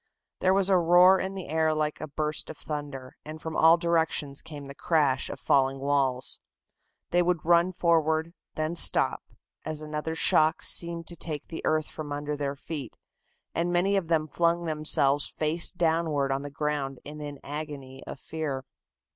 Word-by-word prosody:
There 185 +1 +3
was 195 -1 +3
a 190 -2 +4
roar 180 +3 +6
in 190 +1 -3
the 190 - -6
air 160 +1 +1
like 150 -1 -1
a 155 - -4
burst 150 +1 -3
of 155 - -8
thunder, 145 -4 -6
and 155 +1 -8
from 160 0 -6
all 165 +1 +6
directions 160 -4 0
came 145 -3 -9
the 140 - -8
crash 140 -4 +1
of - - -6
falling 135 -1 +2
walls. 135 -2 0 0.7
They 175 - +4
would 175 -2 0
run 170 +2 +4
forward, 165 -2 +1 0.2
then 155 +2 -2
stop, - - +3 0.4
as 155 -1 -4
another 155 +1 -4
shock 155 0 +3
seemed 170 -1 0
to 170 - -7
take 155 -3 -6
the 165 - -6
earth 155 -1 +2
from 150 -2 -7
under 145 +1 -3
their 140 -1 -3
feet, 140 -3 -7 0.6
and 170 +1 0
many 185 +3 +2
of 190 -4 0
them 160 -2 +1
flung 170 +2 +1
themselves 150 -3 +2
face 160 +2 +1
downward 160 -5 0
on 135 0 0
the 145 - -6
ground 140 -2 -2
in 150 +1 -8
an 145 -1 -6
agony 145 -3 -6
of - - -7
fear. 140 -4 -4
155 Hz, 175 wpm, -27 LUFS, 145-170 Hz, 0.7 s, roar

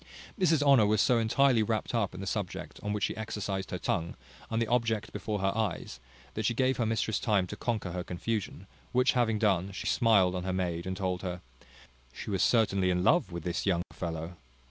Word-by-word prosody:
Mrs 165 -5 +3
Honour 135 -7 +6
was 105 0 +2
so 120 +2 +4
intirely 120 +2 +3
wrapped 110 +1 -1
up 105 -6 0
in 95 - -7
the - - -5
subject 95 -1 -4
on 105 - -3
which 105 -1 -2
she - - 0
exercised 100 -3 -4
her - - -3
tongue, 85 0 -2 0.3
and 115 - 0
the 115 - +2
object 115 -2 0
before 105 -1 -3
her 95 +1 +1
eyes, 100 - -2 0.3
that 110 - -3
she 115 +3 +1
gave 130 +1 +2
her 115 - 0
mistress 110 -1 0
time 105 -4 +2
to - - -7
conquer 110 -7 -2
her 90 0 -3
confusion; 100 +4 -4 0.3
which 125 +1 +4
having 115 -3 +1
done, 100 -3 +1
she 95 - -6
smiled 100 -6 +4
on 90 -1 -3
her 95 - -2
maid, 90 -2 -2
and 95 0 -3
told 95 -2 -2
her, 90 -1 -4 0.7
"she 85 - -7
was 95 -3 0
certainly 100 -5 +3
in 90 0 +1
love 155 - +3
with 85 -1 -5
this 90 +3 -2
young 90 -3 +2
fellow." 85 0 -5
105 Hz, 210 wpm, -30 LUFS, 90-115 Hz, 0.7 s, Honour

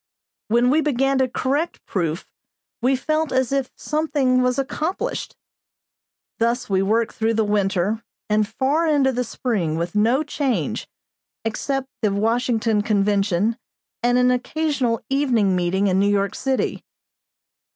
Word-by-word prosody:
When 240 +3 +3
we 310 +3 +3
began 270 -2 +1
to 260 - +3
correct 280 +7 -2
proof 170 -3 -2 0.6
we 260 +3 +3
felt 310 +4 -1
as 260 -1 +1
if 275 -2 0
something 290 -5 +1
was 250 +1 +1
accomplished. 310 +6 -3 1.0
Thus 235 +2 0
we 190 -1 +1
worked 220 +4 +1
through 225 0 0
the 220 - +2
winter 205 +1 0 0.2
and 210 0 +2
far 275 +9 0
into 285 -4 +3
the 250 0 -1
spring, 215 -9 -2
with 170 +1 -3
no 230 +7 +3
change 285 -4 -2 0.6
except 270 +4 -2
the 210 -3 +2
Washington 225 +1 +1
Convention 205 +1 +1 0.4
and 245 +1 +3
an 250 0 +4
occasional 255 -2 0
evening 245 -9 +2
meeting 180 +2 +1
in 190 -1 +2
New 200 +1 +3
York 200 -1 +1
city. 265 -1 -1
240 Hz, 135 wpm, -22 LUFS, 205-270 Hz, 1.0 s, an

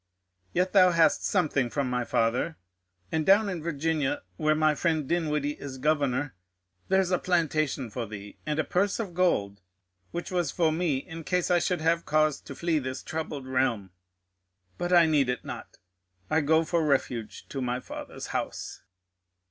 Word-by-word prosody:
Yet 180 +1 0
thou 185 -2 +7
hast 165 -1 +4
something 145 -9 +1
from 135 -1 -1
thy 125 -1 0
father, 120 +10 0 0.5
and 160 - +1
down 200 +4 +5
in 180 -4 -4
Virginia, 155 -2 -1
where 155 +8 +2
my 155 0 +3
friend 155 -1 0
Dinwiddie 150 -3 -1
is 135 -2 -6
Governor, 145 -1 0 0.5
there's 190 -1 +2
a 180 - +2
plantation 155 - 0
for 115 0 -4
thee, 105 -1 -9
and 150 -1 -2
a 155 - +2
purse 195 +6 0
of 200 -6 -4
gold, 105 - +1 0.5
which 175 +2 -5
was 175 -5 0
for 160 +2 +2
me 160 -3 0
in 165 +4 -7
case 180 +2 0
I 175 - +5
should 175 -1 0
have 165 +1 +2
cause 155 -1 +2
to 140 - -9
flee 170 0 +1
this 130 -1 -5
troubled 155 -4 -4
realm. 125 -7 0 0.9
But 175 - -2
I 175 -2 +7
need 150 -5 +2
it 125 - -2
not; - - -8 0.5
I 160 - +4
go 160 +2 +3
for 170 0 +1
refuge 130 -6 -1
to 135 - -4
my 125 0 -1
Father's - - -8
house. - - -4
155 Hz, 170 wpm, -28 LUFS, 135-170 Hz, 0.9 s, thou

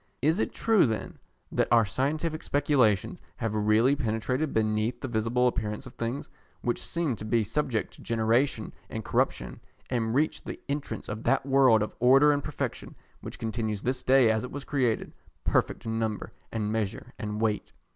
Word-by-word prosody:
Is 160 +7 +3
it - - 0
true 220 - +3
then 110 -1 -4 0.3
that - - +1
our 115 -2 +6
scientific 150 - -1
speculations 135 -8 +2
have 110 -1 -2
really 110 +5 +3
penetrated 125 +3 -1
beneath 110 +2 0
the 130 - -4
visible 120 +2 +1
appearance 105 0 -2
of 130 - -11
things, 120 +4 -3 0.3
which 120 - -1
seem 170 -7 -1
to 105 - -7
be 110 +1 +2
subject 115 0 -1
to - - -15
generation 115 +4 +1 0.2
and - - -5
corruption, - - 0 0.3
and 115 -2 0
reached 155 +2 +1
the - - -5
entrance 145 0 -4
of 105 +1 -5
that 135 -1 +2
world 130 -5 +5
of 105 - -5
order 135 +5 +6
and 145 -1 0
perfection, 150 - -4 0.2
which - - -8
continues 110 -2 -3
this 125 0 -1
day 130 -3 +5
as 110 0 0
it 125 - -5
was 145 -1 -6
created, 125 -6 0 0.3
perfect - - 0
in 115 0 -1
number 110 -2 -3 0.2
and 105 -2 -2
measure 110 +2 -3
and 105 0 -3
weight? 110 -2 -1
120 Hz, 175 wpm, -28 LUFS, 110-135 Hz, 0.3 s, our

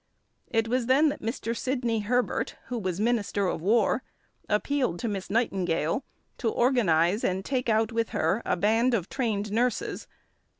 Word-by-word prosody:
It 225 -1 +1
was 245 0 0
then 285 +4 +5
that 285 - -5
Mr. 230 0 -3
Sidney 245 -3 -1
Herbert, 245 +4 0
who 245 -1 -2
was 185 -3 -3
Minister 215 -3 +1
of 170 - -1
War, 220 +5 +2 0.5
appealed 230 -2 0
to 235 - -3
Miss 195 -3 -4
Nightingale 190 - 0 0.4
to 230 - +1
organise 210 -7 +2
and 190 +1 -1
take 255 -3 -1
out 220 +1 +2
with 230 -1 0
her 180 +8 0
a - - 0
band 225 +6 +3
of 190 -5 -2
trained 215 -5 -1
nurses. 240 +3 -1
225 Hz, 160 wpm, -27 LUFS, 200-245 Hz, 0.5 s, then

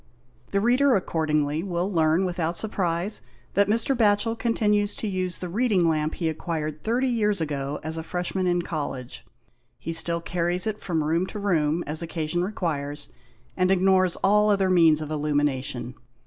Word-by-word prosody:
The 200 - +1
reader 250 +4 +3
accordingly 155 -4 0
will 180 +1 -2
learn 160 +2 +2
without 175 -2 -1
surprise 190 -2 0 0.3
that 200 0 +3
Mr. 230 +5 +2
Batchel 225 0 +2
continues 210 -3 +1
to 220 - -4
use 185 -2 -1
the 180 - -4
reading 200 -2 +1
lamp 155 -1 0
he 170 - -2
acquired 155 -1 -3
30 245 +4 +1
years 210 -5 +1
ago 145 -2 -3
as 160 +1 -3
a - - -3
Freshman 180 +2 -2
in 175 -1 +1
College. 135 -6 -5 0.5
He 165 - -5
still 170 +1 +4
carries 175 +1 0
it 215 -1 -2
from 165 -4 -1
room 165 +4 0
to 210 - -7
room 170 -5 0
as 155 +2 -1
occasion 170 +1 -2
requires, 145 -7 -3 0.5
and 185 0 +1
ignores 185 -1 +3
all 210 +2 +4
other 195 -2 +2
means 165 -4 +5
of 155 0 -5
illumination. 145 -5 -1
175 Hz, 160 wpm, -25 LUFS, 155-200 Hz, 0.5 s, means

